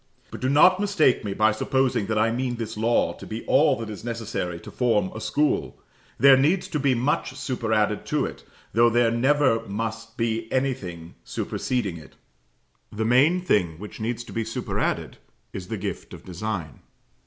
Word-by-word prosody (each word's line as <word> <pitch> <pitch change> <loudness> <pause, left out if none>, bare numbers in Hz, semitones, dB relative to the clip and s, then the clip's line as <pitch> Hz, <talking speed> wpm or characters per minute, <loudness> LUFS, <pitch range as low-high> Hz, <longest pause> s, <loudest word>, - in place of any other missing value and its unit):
But - - -8
do 130 - +1
not 180 +7 +6
mistake 190 -10 +2
me 100 -2 -3
by 110 0 +4
supposing 125 -1 0
that 110 - -1
I 110 +2 +3
mean 125 +1 -2
this 115 -1 -5
law 115 +2 +1
to - - -11
be 110 +2 -6
all 145 0 +4
that 115 -3 -6
is 105 - -8
necessary 110 -7 -4
to - - -10
form 130 +10 +1
a - - -7
school. 150 0 0 0.4
There 135 0 +7
needs 155 +8 +2
to 150 - -2
be 135 -2 +2
much 130 +1 -1
superadded 110 -6 0
to - - +1
it, - - -8 0.3
though 120 +1 +5
there 120 0 +3
never 130 0 +3
must 115 +2 -5
be 115 -1 -2
anything 90 -11 -2
superseding 105 -9 -2
it. 75 -4 -14 0.8
The 110 +1 -2
main 140 +10 +4
thing 90 - +1
which 105 +4 -9
needs 120 +2 -3
to - - -11
be 115 - -1
superadded 110 +1 -3 0.4
is - - -6
the - - -4
gift - - -5
of - - -15
design. 90 -5 -5
115 Hz, 175 wpm, -25 LUFS, 110-130 Hz, 0.8 s, There